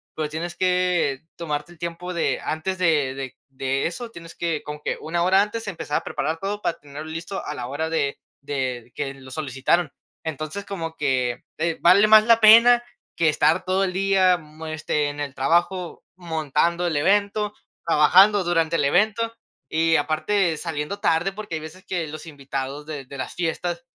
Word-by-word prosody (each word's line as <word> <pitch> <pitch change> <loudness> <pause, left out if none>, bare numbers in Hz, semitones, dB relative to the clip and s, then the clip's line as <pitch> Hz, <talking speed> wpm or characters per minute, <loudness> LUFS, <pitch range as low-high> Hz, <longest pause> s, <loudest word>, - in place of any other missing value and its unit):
pero 155 -1 -2
tienes 165 +3 -5
que 180 -7 +1 0.2
tomarte 150 -1 -4
el 175 - -17
tiempo 170 +2 -5
de 170 - 0
antes 185 +4 -2
de 155 -7 +2
de 135 -2 -6
de 135 0 -2
eso, 230 +8 -6
tienes 165 -4 -11
que 165 -3 -2
como 150 0 -7
que - - -2
una 170 +2 -1
hora 190 +2 +5
antes 220 +2 -3
empezar 165 -6 -2
a - - -3
preparar 160 +3 -2
todo 205 +2 -3
para 170 - -2
tenerlo 145 +2 -9
listo 170 +4 -5
a - - -4
la 125 -4 -5
hora 150 +5 -3
de 140 -4 -1 0.2
de 130 -4 -3
que 140 -2 -3
lo 130 -1 -13
solicitaron. 140 +3 0 0.3
Entonces, 160 +6 -4
como 165 -5 -5
que, 130 -4 0
eh, 165 +1 -1
vale 185 +4 +6
más 215 0 +8
la 230 0 +5
pena 235 +3 +8 0.3
que 165 -2 +3
estar 155 +4 +2
todo 185 +1 +1
el 185 - -3
día, 190 -1 +3
mm, 155 0 -12
este, 155 -1 -1
en 145 0 -5
el 140 -2 -4
trabajo 175 +6 0
montando 170 0 0
el 165 -4 0
evento, 205 +5 +1 0.3
trabajando 185 +6 +6
durante 170 -2 +1
el 155 - +2
evento, 215 +9 +2 0.4
y 165 +1 +2
aparte 160 +3 +1
saliendo 160 +4 -4
tarde, 175 +1 +1
porque 205 -4 -6
hay 155 - -4
veces 160 +4 -11
que 175 -4 -2
los 155 +2 -8
invitados 140 -1 -5
de 150 -3 -6
de 140 +2 -10
las 130 - -5
fiestas, 175 +4 -2
165 Hz, 185 wpm, -23 LUFS, 150-185 Hz, 0.4 s, más